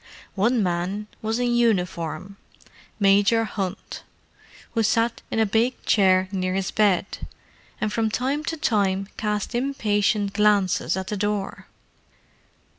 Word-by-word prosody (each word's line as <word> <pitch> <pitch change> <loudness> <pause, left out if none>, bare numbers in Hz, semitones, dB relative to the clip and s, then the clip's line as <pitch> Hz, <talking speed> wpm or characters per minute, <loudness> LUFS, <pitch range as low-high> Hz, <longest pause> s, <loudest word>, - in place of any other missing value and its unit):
One 225 +3 +2
man 180 +3 -2 0.2
was 220 +1 -1
in 245 -1 0
uniform: 185 -5 -1 0.6
Major 205 +3 +4
Hunt, 195 -3 -5 0.7
who 230 - 0
sat 230 +2 +1
in - - -3
a 220 - +4
big 225 +5 +1
chair 190 -2 +4
near 185 -1 -1
his 195 -1 -2
bed, 200 -3 0 0.5
and 210 0 -2
from 225 -1 +1
time 270 +7 -1
to 325 - -3
time 195 -7 0
cast 210 +1 -2
impatient 210 -5 0
glances 200 -3 +2
at 190 - -3
the 210 - -2
door. 205 -1 -3
210 Hz, 125 wpm, -24 LUFS, 195-225 Hz, 0.7 s, Major